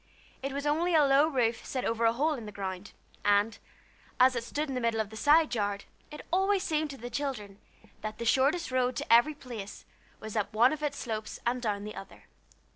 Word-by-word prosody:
It 275 +1 -3
was 280 +1 -4
only 325 +4 +1
a 300 -2 +6
low 275 +2 +5
roof 240 -6 0
set 255 - -3
over 230 0 0
a 225 - +4
hole 300 +6 +1
in 235 -7 -7
the - - -7
ground, 195 -1 -6 0.3
and, 205 +2 +2 0.6
as 255 0 +6
it 235 - -2
stood 295 +6 -3
in 270 - -4
the 250 - -2
middle 230 -1 0
of 215 -1 -2
the - - -9
side 295 +3 +4
yard, 205 -3 -2 0.2
it 300 - -9
always 385 +1 +2
seemed 310 -2 0
to 275 - -8
the 245 0 -8
children 215 -9 -4 0.4
that 215 0 -5
the 235 - -5
shortest 275 +7 +2
road 255 0 +1
to - - +1
every 295 +6 +5
place 230 -8 -8 0.3
was 220 0 -8
up 205 -1 -1
one 240 +6 +5
of 305 - -6
its 290 -2 -2
slopes 220 -3 -5
and 245 +1 0
down 205 -3 -2
the 210 0 -6
other. 195 - -11
245 Hz, 220 wpm, -29 LUFS, 215-290 Hz, 0.6 s, a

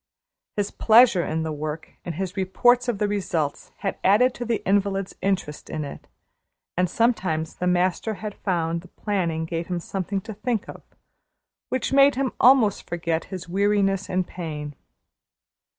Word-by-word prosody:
His 205 -1 0
pleasure 225 -5 +5
in 160 0 -2
the 160 - -3
work 155 +1 -5
and 170 - -5
his 185 +1 -4
reports 245 +6 +3
of 240 -4 0
the 210 0 +1
results 170 -8 -2
had 195 - -2
added 245 +6 +5
to 245 - -5
the 230 -1 -2
invalid's 195 -1 +1
interest 190 -6 -2
in 155 -2 -3
it, 140 - -9 0.7
and 180 0 +1
sometimes 180 -9 0
the 180 - -1
master 180 +4 +1
had 210 0 -6
found 170 -4 -1
the 180 - -15
planning 170 -7 -2
gave 165 0 -3
him 180 -1 -2
something 195 +3 -3
to 220 +2 -7
think 215 +1 -2
of, - - -9 0.9
which 260 +1 -1
made 275 0 +6
him 265 -1 0
almost 245 -6 +5
forget 170 -1 -1
his 185 -2 -7
weariness 195 +1 +1
and 185 0 0
pain. 150 -5 -6
190 Hz, 160 wpm, -24 LUFS, 170-210 Hz, 0.9 s, made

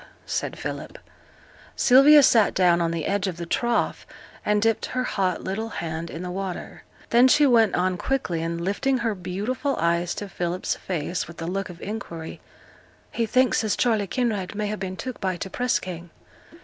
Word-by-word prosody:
said - - -3
Philip. - - -6 0.8
Sylvia 275 +3 +7
sate 225 -5 +4
down 175 -2 +4
on 165 - +1
the 165 -2 -3
edge 200 -1 0
of 180 -3 -4
the 170 - -5
trough, 235 +7 -1 0.4
and 210 0 +2
dipped 225 +1 +1
her 255 0 -2
hot 190 -7 -1
little 220 +4 -3
hand 165 -4 -4
in 165 +3 -6
the 180 - -4
water. 190 -1 -5 0.3
Then 240 +2 +6
she 295 +3 +5
went 230 -5 +4
on 180 0 +1
quickly, 180 -9 -1
and 165 +1 -3
lifting 205 +9 0
her 235 -2 -1
beautiful 210 +9 -2
eyes 170 +1 +1
to 205 - -5
Philip's 180 -1 -2
face, 175 -1 -3
with 170 - -12
a 165 - -4
look 190 +3 -3
of 175 -1 -10
inquiry 170 -6 -6 0.7
'He 230 -1 -1
thinks 255 +1 +3
as 215 - +1
Charley 220 -5 +1
Kinraid 215 -5 -2
may 210 0 -2
ha' 215 - -4
been 190 -1 -5
took 255 -2 -6
by 185 -2 -1
t' 190 - -5
press 250 +5 0
gang.' 175 -2 -7
195 Hz, 185 wpm, -24 LUFS, 175-235 Hz, 0.8 s, Sylvia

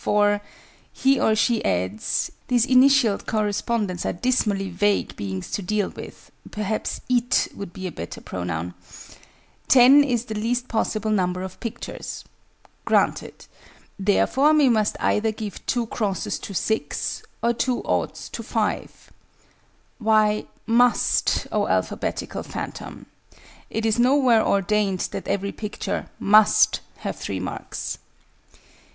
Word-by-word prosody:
For," 205 0 +2 0.5
he 270 +1 +2
or 220 - +3
she 230 +1 +1
adds 95 +3 -1 0.2
(these 245 -2 +3
initialed 260 -4 +4
correspondents 210 -3 -1
are - - -1
dismally 205 -2 0
vague 200 +3 0
beings 95 -2 -5
to - - -2
deal 205 +1 -1
with: - - -11 0.2
perhaps 210 0 -3
"it" 245 -1 +2
would 200 -3 -7
be 190 +2 -8
a 180 - -3
better 85 - -7
pronoun), 90 -1 -4 0.9
"10 265 +3 +7
is 245 -4 -1
the 220 - -5
least 240 +4 -1
possible 220 -1 -1
number 180 -2 0
of 190 -1 -8
pictures" 235 0 -6 0.6
(granted): - - 0 0.5
"therefore 265 +9 +3
we 290 -4 +5
must 215 -3 +1
either 220 +1 +1
give 215 -2 -7
2 240 -2 0
x's 200 -6 -2
to - - -8
6, 220 +4 -2 0.2
or 235 0 +3
2 245 +1 -1
o's - - -2
to - - -6
5." - - -3 0.9
Why 215 -1 +3 0.2
"must," 240 +2 +2
oh - - +1
alphabetical - - -2
phantom? - - -7 0.6
It 225 0 -2
is 225 +1 +1
nowhere 250 -3 +4
ordained 200 -1 +1
that - - -6
every 200 0 -1
picture 210 -2 -4
"must" 210 +1 +5 0.2
have - - -4
3 - - -4
marks! - - -5
215 Hz, 125 wpm, -23 LUFS, 195-240 Hz, 0.9 s, 10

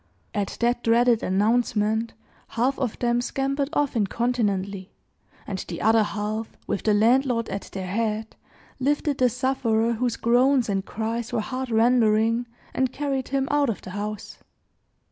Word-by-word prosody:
At 205 -2 -2
that 240 +1 +1
dreaded 235 0 +4
announcement, 220 +2 +1 0.3
half 250 +4 0
of 250 -5 -2
them 240 0 +1
scampered 275 +2 -1
off 290 -4 0
incontinently; 200 -3 -1 0.6
and 190 -2 -4
the 170 - -5
other 225 +1 +4
half 215 +1 -3
with - - -2
the 215 - +2
landlord 235 +2 +3
at 200 - -5
their 190 -1 -5
head, 215 +3 -2 0.4
lifted 285 +1 0
the 250 -1 +4
sufferer 235 -2 +1
whose 240 0 -1
groans 250 +1 +3
and 195 -1 0
cries 225 +3 -3
were - - 0
heart 255 +4 -4
rendering, 230 0 +3 0.3
and 260 -1 0
carried 270 -2 -2
him 270 0 0
out 290 -2 +2
of 220 - -4
the 185 - -8
house. 205 +1 -5
230 Hz, 145 wpm, -25 LUFS, 215-255 Hz, 0.6 s, dreaded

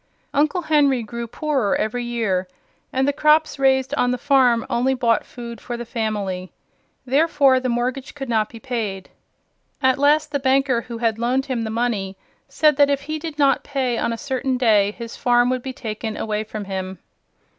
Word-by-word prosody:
Uncle 305 +5 +1
Henry 285 -6 +3
grew 235 +2 -6
poorer 270 -4 0
every 240 +3 -1
year, 220 -6 -1 0.4
and 265 +1 +1
the 285 - +2
crops 305 +1 +3
raised 265 -1 +2
on 245 - +1
the 250 - 0
farm 250 -3 +3
only 250 +3 +1
bought 235 -3 +2
food 235 -2 -9
for 240 -1 -5
the 240 - -6
family. 205 -5 -3 0.5
Therefore 275 -1 +3
the 255 0 -2
mortgage 250 +4 -2
could 270 -2 -6
not 220 -2 +1
be 230 - -11
paid. 220 -7 -4 0.7
At 260 -1 +2
last 300 +1 +3
the 285 - 0
banker 265 -2 +2
who 235 -1 -8
had 225 -1 0
loaned 255 +3 0
him 260 -5 -2
the 220 - -3
money 220 -4 -2 0.3
said 305 -3 +3
that 285 -1 +5
if 280 -1 +1
he 310 +2 -4
did 315 -1 -6
not 280 -2 +3
pay 260 -4 -1
on - - 0
a 230 - -3
certain 265 -1 -2
day, 215 -5 +4
his 230 +2 -8
farm 245 0 +3
would 255 -1 -1
be 265 - -5
taken 220 -4 -5
away 215 0 -2
from 215 -1 -6
him. 190 -1 -5
245 Hz, 190 wpm, -21 LUFS, 225-275 Hz, 0.7 s, that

